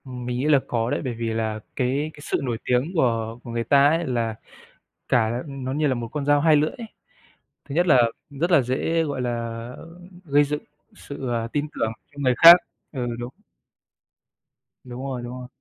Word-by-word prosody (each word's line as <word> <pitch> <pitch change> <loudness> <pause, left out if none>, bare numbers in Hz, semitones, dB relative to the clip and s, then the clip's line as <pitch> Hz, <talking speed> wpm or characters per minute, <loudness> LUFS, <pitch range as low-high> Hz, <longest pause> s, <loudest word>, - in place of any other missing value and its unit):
Mình 125 -1 -5
nghĩ 130 - -1
là 145 -3 +5
có 115 -1 -1
đấy. - - -1
Bởi 130 -3 -3
vì 115 -1 -3
là 110 -1 -2 0.2
cái 135 +5 -1
cái - - -16
sự - - -1
nổi 120 -4 -2
tiếng 125 +6 0
của 115 -5 0
của 120 - -8
người 115 0 -1
ta 140 +4 +5
ấy, 165 +2 0
là 115 -3 -1 0.7
cả 120 0 +1
nó 135 -2 -5
như 150 +2 +1
là 135 - +2
một 120 -1 -4
con 150 -2 -3
dao 145 0 +4
hai 155 0 +5
lưỡi 150 +1 +2
ấy. 230 - -9 0.8
Thứ 140 - -5
nhất 175 +2 +2
là 130 -7 +6 0.3
rất 155 +5 -2
là 170 - +6
dễ, 135 +7 0
gọi 140 -4 -3
là, 125 - -1 0.5
ơ, 165 +2 -13 0.3
gây 145 -1 +4
dựng 150 +1 -3 0.3
sự, 140 -2 -7
ờ, 115 -1 -1
tin 145 0 -1
tưởng 110 - -1 0.2
cho 145 - -21
người 130 -2 +2
khác. 170 +4 +11 0.4
Ừ, 125 -4 -3
đúng. 120 0 -5 1.5
Đúng 125 0 -8
rồi, 130 -3 -4
đúng 120 - -6
rồi. 125 - -8
130 Hz, 205 wpm, -23 LUFS, 120-145 Hz, 1.5 s, khác